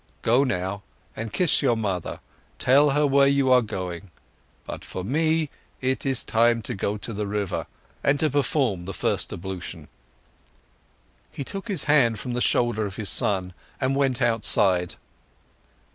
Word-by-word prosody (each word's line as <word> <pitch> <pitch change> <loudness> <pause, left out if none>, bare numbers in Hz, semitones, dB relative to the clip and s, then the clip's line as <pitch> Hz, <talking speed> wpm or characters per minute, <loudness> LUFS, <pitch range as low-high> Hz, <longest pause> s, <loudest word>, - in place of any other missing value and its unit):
Go 120 +4 +3
now 100 -5 -3 0.3
and 110 0 -6
kiss 180 - +2
your 120 -5 +2
mother, 95 -6 -3 0.4
tell 140 +3 +4
her 145 +2 +2
where 140 0 +4
you 140 -1 +2
are 125 -1 +6
going 90 -6 -5
to. 95 - -22 0.5
But - - -7
for 95 - -6
me 155 - 0 0.3
it 130 +1 -2
is 135 -2 +2
time 115 0 +2
to 125 - -4
go 100 0 -2
to 115 +2 -6
the 105 0 -3
river 100 -2 -3 0.4
and 140 +1 +2
to 155 -2 +1
perform 130 - 0
the 95 0 -6
first - - -1
ablution." 90 -3 -7 1.4
He 140 - -6
took 195 - -6
his 195 -7 +1
hand 130 -7 +3
from 125 +1 -5
the 125 - -2
shoulder 115 -4 +1
of 95 - -8
his 105 -1 +2
son 95 -3 +4 0.3
and 130 +1 0
went 135 -3 0
outside. 100 -6 +3
120 Hz, 160 wpm, -24 LUFS, 100-140 Hz, 1.4 s, are